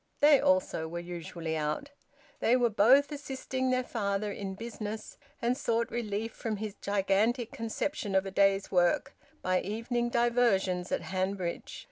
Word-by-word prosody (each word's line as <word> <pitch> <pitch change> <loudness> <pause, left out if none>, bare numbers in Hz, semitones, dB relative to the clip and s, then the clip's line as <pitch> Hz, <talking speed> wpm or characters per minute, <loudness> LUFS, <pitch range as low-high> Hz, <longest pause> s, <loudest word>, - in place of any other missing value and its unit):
They 290 -1 +7
also 185 -3 +2
were 170 +2 -5
usually 170 -1 -5
out. 155 - -2 0.5
They 240 - +4
were 245 -2 +3
both 255 +9 +5
assisting 265 -2 -3
their 255 0 +2
father 205 -3 -2
in 195 -1 -5
business, 220 0 -6 0.3
and 240 +1 +2
sought 235 -2 0
relief 225 -1 -2
from 220 -2 -3
his 215 0 -4
gigantic 205 +4 +1
conception 225 -1 -3
of 190 0 +3
a 195 - -4
day's 195 0 +2
work 175 -2 +2 0.3
by 185 0 +2
evening 235 +4 -2
diversions 235 -7 +2
at - - 0
Hanbridge. 185 -1 -3
210 Hz, 145 wpm, -30 LUFS, 190-240 Hz, 0.5 s, They